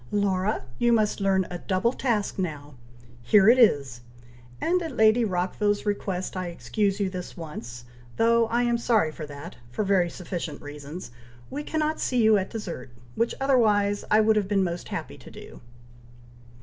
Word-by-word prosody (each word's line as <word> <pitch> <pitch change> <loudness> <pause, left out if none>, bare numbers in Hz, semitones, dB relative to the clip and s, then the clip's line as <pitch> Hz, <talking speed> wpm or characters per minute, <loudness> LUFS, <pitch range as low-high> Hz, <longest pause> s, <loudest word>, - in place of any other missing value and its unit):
"Laura, 200 -2 0 0.2
you 240 0 +3
must 215 -2 +2
learn 190 -1 +2
a 175 - -5
double 190 +7 0
task 225 -8 -1
now! 150 -5 -4 0.5
Here 195 - +5
it 250 +2 +6
is! 140 - +3 0.6
and 360 +2 +1
at 320 -6 -5
Lady 220 +2 +5
Rockville's 205 +2 0
request 195 -3 -2
I 185 -1 -3
excuse 200 +3 -1
you 200 - +1
this 185 -1 -7
once; 120 -7 -8 0.3
though 230 0 +4
I 235 +2 +1
am 240 -1 +1
sorry 220 -9 +2
that, 145 -2 -9
for 125 - -2
very 190 -3 +2
sufficient 170 -4 -6
reasons, 145 0 -9 0.4
we 285 - -3
cannot 310 +1 -1
see 250 -3 +1
you 220 0 +6
at 190 - -4
dessert, 175 - -6 0.2
which 230 - 0
otherwise 210 -7 +2
I 215 +1 +5
should 220 0 +3
have 205 -2 +1
been 200 -1 +2
most 175 -1 -3
happy - - -6
to - - -13
do." - - -12
200 Hz, 165 wpm, -26 LUFS, 175-225 Hz, 0.6 s, it